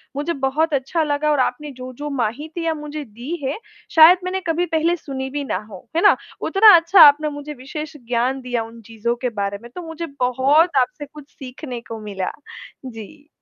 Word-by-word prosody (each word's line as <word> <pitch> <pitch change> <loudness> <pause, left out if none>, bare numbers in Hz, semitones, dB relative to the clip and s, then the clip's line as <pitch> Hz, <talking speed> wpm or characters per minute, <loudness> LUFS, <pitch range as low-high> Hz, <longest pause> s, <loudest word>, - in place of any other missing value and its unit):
मुझे 295 +4 -2
बहुत 305 +4 0
अच्छा 280 +5 0
लगा 300 0 0
और 290 - +1
आपने 295 +3 -1
जो-जो 255 +3 -7
माहितियाँ 315 +8 -2
मुझे 300 0 -6
दी 240 +9 -6
हैं, 270 +3 -2 0.4
शायद 325 +3 +9
मैंने 370 +1 -2
कभी 335 +2 +1
पहले 330 +2 +2
सुनी 265 -4 -6
भी 285 +1 -4
ना 255 - -2
हो, 195 +3 -12
है 335 - +2
ना? 410 - +6 0.3
उतना 410 0 +7
अच्छा 340 +3 +5
आपने 300 +1 +7
मुझे 290 +1 -7
विशेष 295 +4 -8
ज्ञान 250 +3 0
दिया 245 -2 -2
उन 230 +1 -12
चीज़ों 235 +2 -2
के - - +2
बारे 200 0 -2
में। 235 - -12
तो 360 - -5
मुझे 325 +1 -5
बहुत 270 +6 +3
आपसे 290 +4 -3
कुछ 295 0 -14
सीखने 255 -2 -8
को 225 -1 -6
मिला। 195 -3 -4 0.5
जी। 255 +5 -10
285 Hz, 190 wpm, -21 LUFS, 250-315 Hz, 0.5 s, शायद